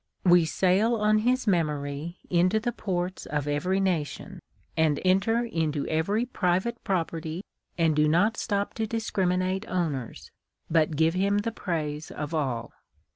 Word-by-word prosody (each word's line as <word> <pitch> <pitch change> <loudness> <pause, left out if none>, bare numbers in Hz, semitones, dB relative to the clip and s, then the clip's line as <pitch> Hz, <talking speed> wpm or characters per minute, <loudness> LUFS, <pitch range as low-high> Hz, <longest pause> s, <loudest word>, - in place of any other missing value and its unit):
We 175 -2 +6
sail 190 +8 +2
on 215 -1 +3
his 250 +3 +1
memory 155 -3 -1
into 180 +4 +3
the 240 +2 -1
ports 185 -4 -3
of 150 -1 -2
every 180 +7 0
nation, 175 -7 -2 0.4
enter 185 +9 +2
into 160 -9 -1
every 200 +9 0
private 205 +1 -1
property, 165 -2 -2 0.3
and 165 -2 +3
do 150 0 +4
not 190 +9 +3
stop 200 -2 -1
to 220 - 0
discriminate 190 -3 -1
owners, 155 -10 -3 0.4
but 160 -1 +3
give 160 +2 +3
him 200 +2 +2
tlie 230 +1 -3
praise 155 -6 -3
of 150 +2 -5
all. 130 -7 -2
180 Hz, 135 wpm, -27 LUFS, 155-205 Hz, 0.4 s, We